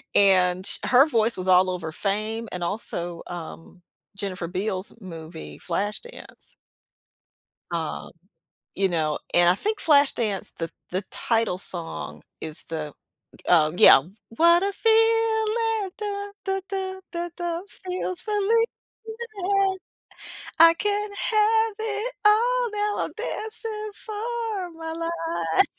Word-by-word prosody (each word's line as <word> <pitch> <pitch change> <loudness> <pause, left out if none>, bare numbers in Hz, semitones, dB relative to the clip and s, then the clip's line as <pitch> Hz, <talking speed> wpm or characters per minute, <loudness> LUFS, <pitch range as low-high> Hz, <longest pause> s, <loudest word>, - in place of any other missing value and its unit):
and, 185 -2 +4
ch - - +6
her 260 +4 +6
voice 230 -4 +1
was 185 0 -4
all 185 0 +5
over 175 -3 -4
"Fame" 215 +6 -2
and 180 -1 -4
also, 175 -3 -2
um, 175 +1 -9 0.3
Jennifer 195 -4 -3
Beals 190 +2 -3
movie, 165 -3 -9
"Flashdance." 205 - -5 1.2
Um, 165 -2 -4 0.6
you 195 0 +2
know, 160 -4 -1
and 175 0 +6
I 180 - +4
think 425 - -2
"Flashdance," 270 - +2
the 165 -1 -4 0.2
the 185 +3 -2
title 225 -5 0
song, 80 - -4 0.2
is 160 0 -3
the 155 -3 -5 0.5
uh, 155 -3 +5
yeah, 155 - +8 0.3
"What 340 +9 +4
a 400 - +1
feeling, 450 -1 +2
duh 410 -1 -3 0.2
duh 385 0 -1
duh 380 -1 -4
duh 345 0 -3
duh, 345 -1 -2
feels 365 -2 -5
relief, 425 +2 +2 1.9
I 330 0 +9
can't 415 +2 -1
have 445 0 +2
it 440 +2 -3
all, 480 +3 +4
now 415 0 -1
I'm - - -8
dancing 440 -1 -5
for 435 -3 -4
my 325 0 -5
life." 330 - 0
325 Hz, 120 wpm, -25 LUFS, -, 1.9 s, I